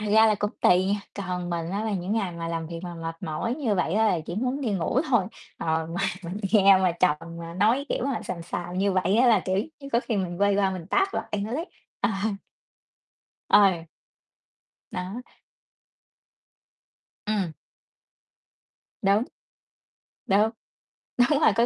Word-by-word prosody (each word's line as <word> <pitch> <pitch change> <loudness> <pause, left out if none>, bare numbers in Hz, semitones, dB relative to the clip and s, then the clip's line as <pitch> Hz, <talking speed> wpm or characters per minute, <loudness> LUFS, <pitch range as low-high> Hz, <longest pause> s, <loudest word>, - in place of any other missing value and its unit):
thật 210 - -3
ra 220 +1 +7
là 215 - +4
cũng 205 0 -1
tùy 180 +1 +5
nha. 200 +1 0
Còn 180 -3 -4
mình 170 -1 -2
á, 205 +3 -2
là 220 - -1
những 190 +1 -2
ngày 200 -5 0
mà 165 0 -5
làm 165 -1 -3
việc 165 0 -6
mà 175 -1 -6
mệt 165 0 -5
mỏi 160 +10 -2
như 255 -8 0
vậy 180 -2 0
á, 220 +1 +4
là 180 -5 +2
chỉ 175 - -4
muốn 255 +6 -1
đi 250 -6 -1
ngủ 195 +7 +1
thôi. 235 -7 +4 0.3
Ờ, 160 0 0
mà 170 +3 -4 0.2
mình 175 +3 -5 0.2
nghe 195 -3 +7
mà 185 -2 +2
chồng 180 -5 +4 0.2
mà 170 0 -7
nói 225 +9 +2
kiểu - - -1
mà 275 -4 -1
xàm 170 -2 -5
xàm 175 +1 -4
như 200 0 +2
vậy 185 +2 +2
á, 250 +2 +5
là, 225 - +5
kiểu 185 0 -1 0.2
như, 275 - -8
có 235 - +4
khi 230 -3 -2
mình 180 -1 -3
quay 200 0 +4
qua 195 -1 +2
mình 185 -3 -6
tát 390 - +2
mặt - - -2
anh 205 -1 -1
ấy. 260 - -3 0.3
Ờ. - - +2 1.4
Ờ. 190 -5 +5 1.1
Đó. 185 +7 -5 2.0
Ừm. 200 -6 0 1.5
Đúng. 200 +2 +4 1.0
Đúng, 210 +3 +3 0.7
đúng 260 +4 +4
rồi, 305 - +5
có 235 +2 +4
195 Hz, 175 wpm, -26 LUFS, 175-220 Hz, 2.0 s, ra